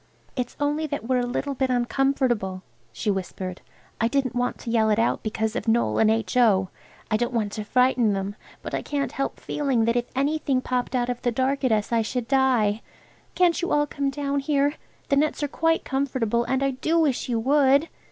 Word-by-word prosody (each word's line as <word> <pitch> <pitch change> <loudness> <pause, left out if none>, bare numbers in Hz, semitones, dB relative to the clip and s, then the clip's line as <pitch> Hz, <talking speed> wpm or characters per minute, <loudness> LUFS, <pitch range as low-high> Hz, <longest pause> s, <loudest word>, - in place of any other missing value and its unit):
"It's 250 -2 -4
only 295 +2 0
that 285 -5 -4
we're 255 -1 +2
a 245 - -1
little 280 +3 -2
bit 265 0 -1
uncomfortable," 245 -6 0 0.3
she 205 - -1
whispered. 185 -1 -5 0.4
"I 230 - +4
didn't 265 0 0
want 245 0 -1
to 230 - -4
yell 220 -2 +3
it 210 - +2
out 230 - +1
because 220 +1 -2
of 250 - -3
Noël 230 0 +2
and 220 - +5
H.O. 220 -4 +2 0.4
I 215 - +3
don't 240 +2 -2
want 215 -3 0
to 215 - -4
frighten 250 -1 +3
them, 195 +1 -3 0.3
but - - -6
I - - -1
can't 285 -1 -2
help 275 - -3
feeling 270 -6 0
that 230 +1 +1
if 240 0 +1
anything 280 -1 +1
popped 250 0 -2
out 245 -1 0
of 245 -1 -3
the 245 - +1
dark 265 +4 0
at 255 - +2
us 215 0 0
I 230 -1 +3
should 230 +1 -3
die. 250 -6 +2 0.5
Can't 355 -2 +3
you 350 - -2
all 295 0 +3
come 280 -1 -2
down 280 0 -2
here? 285 0 +1 0.4
The 280 - +3
nets 300 +1 +1
are - - +1
quite 325 +3 0
comfortable, 250 -4 0
and 265 +1 0
I 275 - +2
do 315 +6 0
wish 290 -6 +1
you 235 -2 +1
would." 280 +4 +4
250 Hz, 210 wpm, -25 LUFS, 225-280 Hz, 0.5 s, and